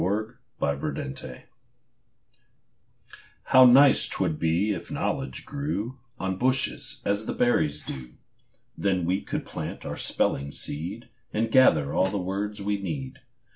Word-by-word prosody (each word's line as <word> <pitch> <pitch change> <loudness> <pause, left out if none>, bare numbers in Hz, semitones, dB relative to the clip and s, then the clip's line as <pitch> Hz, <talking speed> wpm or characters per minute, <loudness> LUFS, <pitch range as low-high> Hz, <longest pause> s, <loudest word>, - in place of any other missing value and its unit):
EASY 105 +4 0 0.3
KNOWLEDGE 65 -2 -3 2.0
How 130 0 +7
nice 135 +3 +6
'twould 75 - -1
be 85 +6 +2
if - - -7
knowledge 65 -1 -3
grew 135 -4 -3 0.2
On 95 0 -2
bushes, 130 +1 0
as 100 +2 0
the - - -1
berries 75 -12 +1
do! 65 -2 -7 0.6
Then 95 -3 0
we 95 +3 +1
could - - -4
plant - - -6
our - - -4
spelling 70 +1 0
seed, 95 +15 -5 0.2
And 110 +1 -1
gather 80 - +5
all 95 - +3
the 100 - -2
words 100 +2 -3
we 100 0 -1
need. 130 +6 -5
100 Hz, 130 wpm, -26 LUFS, 80-120 Hz, 2.0 s, How